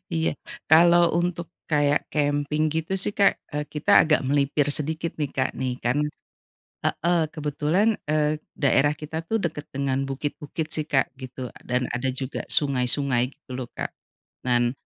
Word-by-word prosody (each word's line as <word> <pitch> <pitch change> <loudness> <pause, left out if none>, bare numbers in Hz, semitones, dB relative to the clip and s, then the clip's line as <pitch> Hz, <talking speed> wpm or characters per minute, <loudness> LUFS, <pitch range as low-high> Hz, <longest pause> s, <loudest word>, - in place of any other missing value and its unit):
iya. 80 -1 0 0.3
Kalau 170 +1 +6
untuk 175 -1 -1 0.2
kayak 145 -1 +2
camping 145 +1 +1
gitu 160 +4 -2
sih 205 - 0
Kak, 200 -1 +4 0.2
eee, 150 - -1
kita 180 +7 +5
agak 155 -1 +3
melipir 145 0 +2
sedikit 155 +3 -2
nih 145 -3 -2
Kak, 130 - 0
nih 130 -1 -1
kan, 120 +4 +1 0.9
heeh. 175 +1 +1
Kebetulan, 155 +6 0 0.2
eee, 155 0 +1 0.2
daerah 145 +1 +3
kita 155 +1 -7
tuh, 225 - +1
dekat 150 -3 -3
dengan 135 0 -1
bukit-bukit 150 +3 -4
sih 155 -1 -2
Kak, 135 -2 +2
gitu, 130 -1 -7 0.2
dan 125 +1 +1
ada 125 +2 -1
juga 130 +1 -4
sungai-sungai 135 -2 +2
gitu 145 - -28
loh, 125 -1 -5
Kak. - - -3 0.6
Nan 120 0 +3
145 Hz, 150 wpm, -25 LUFS, 135-155 Hz, 0.9 s, Kalau